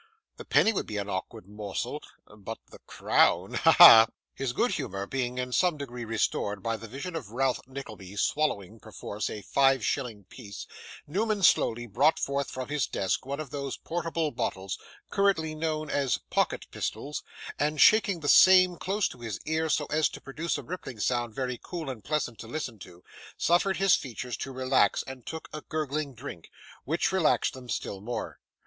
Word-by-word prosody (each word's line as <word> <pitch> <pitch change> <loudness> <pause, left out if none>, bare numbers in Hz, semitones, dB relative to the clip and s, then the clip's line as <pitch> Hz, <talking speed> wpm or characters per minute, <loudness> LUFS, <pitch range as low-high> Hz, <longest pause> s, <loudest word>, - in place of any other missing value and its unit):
The - - -9
penny 225 - +4
would - - -2
be 105 - -4
an 100 0 -3
awkward 95 +2 -5
morsel 105 -2 -4 0.3
but 105 +2 -7
the - - -13
crown - - +2
ha! - - +4
ha!' 115 0 +10 0.3
His 135 -2 -2
good 240 - +1
humour 100 -8 -3
being 125 +1 -3
in 125 0 -3
some 175 +4 +2
degree 125 -4 -6
restored 105 -2 -1
by 115 0 0
the 115 +1 -9
vision 140 - -6
of 145 -10 -5
Ralph 130 +2 0
Nickleby 110 -8 -9
swallowing, 110 -5 -1
perforce, 105 -1 -5
a 105 - -7
five 135 +3 +3
shilling 120 -7 -2
piece, 100 0 -10 0.4
Newman 205 +5 -1
slowly 120 -7 +3
brought 130 +9 +3
forth 140 0 -2
from 130 +1 -6
his 145 -3 0
desk 95 +6 -1
one 140 +1 -3
of 150 -5 -6
those 140 -2 -4
portable 165 -2 -2
bottles, 95 -6 -3 0.3
currently 190 -6 +1
known 155 -1 -2
as 140 -3 +1
pocket - - 0
pistols, 145 +2 -4 0.4
and 150 +1 0
shaking 200 -5 +5
the 145 - -4
same 185 +1 +7
close 200 +4 0
to 125 - -11
his 115 -4 -5
ear 160 +1 0
so 150 0 +1
as 155 -1 +3
to - - -9
produce 155 +5 -3
a - - -7
rippling 135 -10 -7
sound 120 0 -1
very 125 -2 -3
cool 165 -6 -5
and 110 -5 -10
pleasant 145 -7 -2
to 110 - -8
listen 120 -4 -5
to, 90 -1 -13 0.3
suffered 180 +3 +2
his 195 -1 +4
features 125 -2 -2
to 135 - -5
relax, 130 0 +2
and 130 -2 -10
took 160 0 -6
a 155 - -5
gurgling 150 -3 -3
drink, 115 - -9 0.4
which 160 +6 0
relaxed 185 -5 +2
them 130 -2 -11
still 95 -4 -4
more. 120 +4 -5
135 Hz, 180 wpm, -28 LUFS, 115-155 Hz, 0.4 s, ha